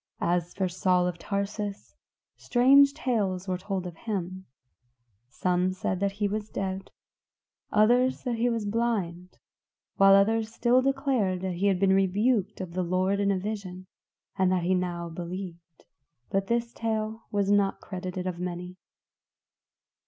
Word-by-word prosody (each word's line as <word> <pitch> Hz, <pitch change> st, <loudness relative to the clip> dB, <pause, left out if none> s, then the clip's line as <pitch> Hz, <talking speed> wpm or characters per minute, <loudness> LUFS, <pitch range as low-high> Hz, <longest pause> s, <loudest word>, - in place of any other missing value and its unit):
As 175 Hz, 0 st, 0 dB
for 190 Hz, -2 st, 0 dB
Saul 180 Hz, 0 st, +1 dB
of 180 Hz, -1 st, -3 dB
Tarsus, 200 Hz, +1 st, -4 dB, 0.4 s
strange 275 Hz, +3 st, +5 dB
tales 200 Hz, -, -1 dB
were 185 Hz, -1 st, -1 dB
told 190 Hz, -1 st, -3 dB
of 175 Hz, -2 st, -7 dB
him; 190 Hz, -2 st, -5 dB, 0.8 s
some 180 Hz, +6 st, 0 dB
said 185 Hz, 0 st, -2 dB
that 200 Hz, 0 st, 0 dB
he 205 Hz, 0 st, -1 dB
was 210 Hz, +1 st, -3 dB
dead; 190 Hz, 0 st, -4 dB, 0.8 s
others 245 Hz, +5 st, +3 dB
that 240 Hz, -2 st, -2 dB
he 240 Hz, +2 st, +2 dB
was 230 Hz, -3 st, -2 dB
blind; 200 Hz, -6 st, -2 dB, 0.6 s
while 195 Hz, 0 st, +7 dB
others 220 Hz, +2 st, +2 dB
still 245 Hz, +2 st, +3 dB
declared 260 Hz, -9 st, 0 dB
that 190 Hz, -1 st, -2 dB
he 185 Hz, +4 st, 0 dB
had 190 Hz, -2 st, +2 dB
been 195 Hz, 0 st, +4 dB
rebuked 200 Hz, +2 st, +1 dB
of 175 Hz, -2 st, -6 dB
the 185 Hz, -, -1 dB
Lord 185 Hz, +3 st, 0 dB
in 200 Hz, 0 st, +2 dB
a 195 Hz, -, +2 dB
vision, 185 Hz, -2 st, -5 dB, 0.5 s
and 190 Hz, -2 st, +2 dB
that 185 Hz, -2 st, +1 dB
he 185 Hz, +2 st, +2 dB
now 175 Hz, -2 st, -2 dB
believed. 170 Hz, -1 st, -8 dB, 0.5 s
But 195 Hz, 0 st, 0 dB
this 235 Hz, 0 st, -1 dB
tale 220 Hz, 0 st, -3 dB
was 200 Hz, -1 st, 0 dB
not 200 Hz, -1 st, +2 dB
credited 185 Hz, -1 st, -5 dB
of 180 Hz, -2 st, -3 dB
many. 180 Hz, 0 st, -5 dB
195 Hz, 150 wpm, -27 LUFS, 180-215 Hz, 0.8 s, while